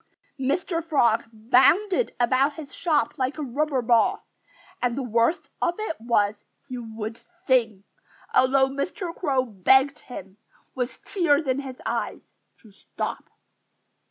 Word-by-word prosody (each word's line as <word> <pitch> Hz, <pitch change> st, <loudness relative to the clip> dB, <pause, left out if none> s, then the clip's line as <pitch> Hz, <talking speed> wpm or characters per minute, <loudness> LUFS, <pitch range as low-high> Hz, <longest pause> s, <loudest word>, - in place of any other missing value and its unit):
Mr. 330 Hz, +6 st, -1 dB
Frog 240 Hz, -8 st, +2 dB
bounded 295 Hz, -, +3 dB
about 260 Hz, +4 st, +3 dB
his 290 Hz, -1 st, -10 dB
shop 310 Hz, -3 st, 0 dB
like 260 Hz, +3 st, -1 dB
a 305 Hz, -, -3 dB
rubber 275 Hz, 0 st, -1 dB
ball. 235 Hz, -1 st, +2 dB, 0.6 s
And 245 Hz, 0 st, 0 dB
the 275 Hz, -, -1 dB
worst 235 Hz, +7 st, +1 dB
of 345 Hz, -, +1 dB
it 430 Hz, -7 st, -3 dB
was, 215 Hz, -3 st, +2 dB, 0.3 s
he 255 Hz, -2 st, -5 dB
would 225 Hz, -1 st, -6 dB, 0.3 s
sing, 230 Hz, -7 st, +2 dB, 0.5 s
although 265 Hz, +1 st, +4 dB
Mr. 335 Hz, +6 st, -4 dB
Crow 270 Hz, -6 st, 0 dB
begged 265 Hz, +7 st, +3 dB
him, 195 Hz, -5 st, -10 dB, 0.4 s
with 250 Hz, -1 st, -4 dB
tears 325 Hz, -5 st, +2 dB
in 260 Hz, 0 st, 0 dB
his 265 Hz, -2 st, -7 dB
eyes, -, -, -4 dB, 0.3 s
to 220 Hz, -, -17 dB
stop. 195 Hz, -, -6 dB
260 Hz, 130 wpm, -25 LUFS, 235-300 Hz, 0.6 s, although